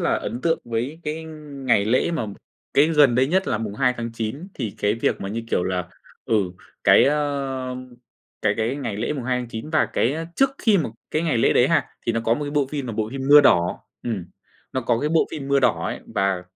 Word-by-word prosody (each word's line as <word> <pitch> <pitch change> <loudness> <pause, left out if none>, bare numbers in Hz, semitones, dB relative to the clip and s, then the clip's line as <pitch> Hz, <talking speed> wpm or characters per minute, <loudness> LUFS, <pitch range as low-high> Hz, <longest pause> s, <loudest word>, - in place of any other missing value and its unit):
là - - +2
ấn 120 - -4
tượng 165 +3 +1
với 120 +7 -3
cái 155 +1 -4
ngày 140 -8 -1
lễ 125 +9 +2
mà 155 -10 -2 0.5
cái 145 - +6
gần 145 -6 +5
đây 130 +2 +3
nhất 185 +6 +1
là 110 - 0
2/9 115 - -2
thì 110 -7 -4
cái 105 +1 +1
việc 115 - -1
mà 95 - -4
như, 115 +3 -3
kiểu 90 - +1
là, 90 -1 -2 0.4
ừ, 115 - 0 0.5
cái, - - +7
ơ, 140 -3 -1 0.7
cái 100 -1 +2
cái 115 +4 -1
ngày 130 -8 -4
lễ 115 +7 -1
2/9 125 -1 -3
và 155 - +3
cái 155 +7 0
trước 270 0 +4
khi 210 -4 +3
mà 145 - -1 0.2
cái 155 - 0
ngày 155 -8 +1
lễ - - +4
đấy - - +4
ha, - - +2 0.2
thì 115 - +2
nó 115 - 0
có 115 - +3
một 150 - -4
cái 145 - -4
bộ 145 -2 +1
phim 140 -3 -3
là 115 - -4
bộ 110 0 -2
phim 135 0 -5
Mưa 145 +1 +10
Đỏ, 90 -11 +3 0.2
ừm, 105 -7 -3 0.5
nó 130 - -1
có 115 -1 +1
cái 150 - 0
bộ 160 +1 +3
phim 140 -3 -6
Mưa 140 0 +3
Đỏ 95 -10 +2
ấy - - -4
và 95 -2 +1
130 Hz, 220 wpm, -23 LUFS, 115-150 Hz, 0.7 s, Mưa